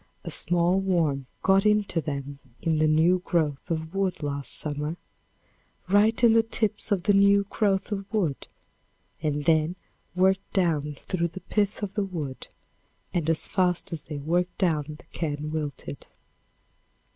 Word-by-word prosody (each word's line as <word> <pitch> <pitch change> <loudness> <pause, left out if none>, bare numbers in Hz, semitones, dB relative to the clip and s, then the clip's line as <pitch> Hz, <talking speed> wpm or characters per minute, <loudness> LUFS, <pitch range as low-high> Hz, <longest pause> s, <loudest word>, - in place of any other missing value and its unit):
A - - -5
small 175 +2 +2
worm 160 -8 0 0.2
got 195 0 +4
into 210 -5 +2
them 140 -2 -5 0.2
in 160 -2 0
the 155 - +4
new 160 +4 +4
growth 155 -7 -1
of 160 0 -3
wood 190 -4 -1
lost 140 -1 -3
summer, 150 +2 -2 0.9
right 210 +5 +3
in 230 -2 +7
the 225 - +6
tips 220 -1 -1
of 190 -4 +1
the 205 - +3
new 200 0 +5
growth 200 -2 +1
of 195 -1 -4
wood, 175 -11 -1 0.7
and 150 -2 -1
then 160 +2 +3 0.4
worked 190 +1 +2
down 155 -6 +1
through 170 -2 -1
the 180 +3 -9
pith 210 0 -1
of 195 -1 -3
the 205 - 0
wood, 155 -9 -5 0.7
and 165 -3 0
as 165 - +2
fast 180 -2 0
as 155 -3 -6
they 150 - -6
worked 175 +5 -1
down 160 -6 +1
the - - -18
can 150 -2 -3
wilted. 145 -3 -5
170 Hz, 155 wpm, -26 LUFS, 150-195 Hz, 0.9 s, in